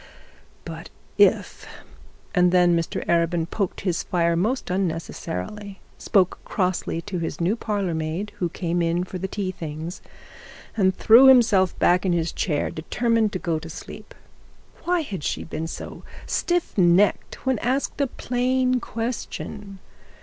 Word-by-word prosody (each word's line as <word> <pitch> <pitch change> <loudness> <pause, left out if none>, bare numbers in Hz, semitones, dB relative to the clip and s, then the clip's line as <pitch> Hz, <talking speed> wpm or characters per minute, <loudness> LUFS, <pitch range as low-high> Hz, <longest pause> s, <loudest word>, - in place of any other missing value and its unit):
But - - -8 0.3
if - - +3 0.7
And 180 -1 +4
then 175 -1 +4
Mr 165 -1 -2
Arabin 170 -1 +1
poked 195 0 -3
his 180 -4 -1
fire 170 -2 +1
most 215 +5 -1
unnecessarily, 190 - -4 0.2
spoke 185 -3 +2
crossly 180 -3 -1
to 195 -4 -4
his 165 - -4
new 175 +6 +1
parlour 205 -6 -2
maid 160 +6 -3
who 175 - 0
came 175 0 -2
in 170 +1 +1
for 185 0 -6
the 190 - -3
tea 190 -1 -3
things, 160 0 -6 0.7
and 190 -3 +2
threw 235 +5 +7
himself 225 -8 +5
back 180 +1 +3
in 185 -2 +1
his 170 -1 0
chair 150 -5 -1
determined 225 +6 0
to - - 0
go 165 -3 -1
to 165 +1 -9
sleep. - - -10 0.7
Why 355 -1 +2
had 200 - -6
she - - -2
been 160 0 -5
so - - -8 0.2
stiff 350 -1 -1
necked 180 +8 +3
when 260 -4 +1
asked 265 +4 -1
a 280 - +2
plain 255 +1 0
question? 215 -4 -5
185 Hz, 145 wpm, -24 LUFS, 170-220 Hz, 0.7 s, threw